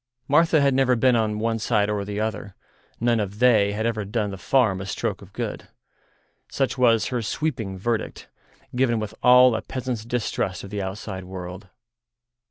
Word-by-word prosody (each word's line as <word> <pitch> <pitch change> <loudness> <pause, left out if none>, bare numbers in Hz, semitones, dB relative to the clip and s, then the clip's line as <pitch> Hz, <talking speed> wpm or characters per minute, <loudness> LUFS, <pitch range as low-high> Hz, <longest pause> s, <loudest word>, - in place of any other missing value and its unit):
Martha 160 +1 +4
had 140 -1 +3
never 130 -1 +3
been 125 +1 +3
on 110 -2 0
one 115 +1 -1
side 105 -2 +1
or 105 -1 -1
the 100 +1 -4
other; 110 -2 -4 0.4
none 120 0 +2
of 100 -1 -3
"they" 110 -4 +4
had 110 +2 -2
ever 110 -2 -1
done 105 0 -2
the - - -5
farm 110 -8 +2
a - - -5
stroke - - -3
of - - -14
good. - - -5 0.8
Such 135 -1 -1
was 120 -4 +3
her 125 -2 -2
sweeping 110 -5 -3
verdict, 115 +3 -3 0.5
given 120 -3 +2
with 110 0 -5
all 125 -1 +6
a - - -2
peasant's 125 -4 -4
distrust 115 -5 -2
of 100 - -9
the 105 -1 -3
outside 95 0 -6
world. 90 +1 -8
110 Hz, 180 wpm, -24 LUFS, 100-125 Hz, 0.8 s, all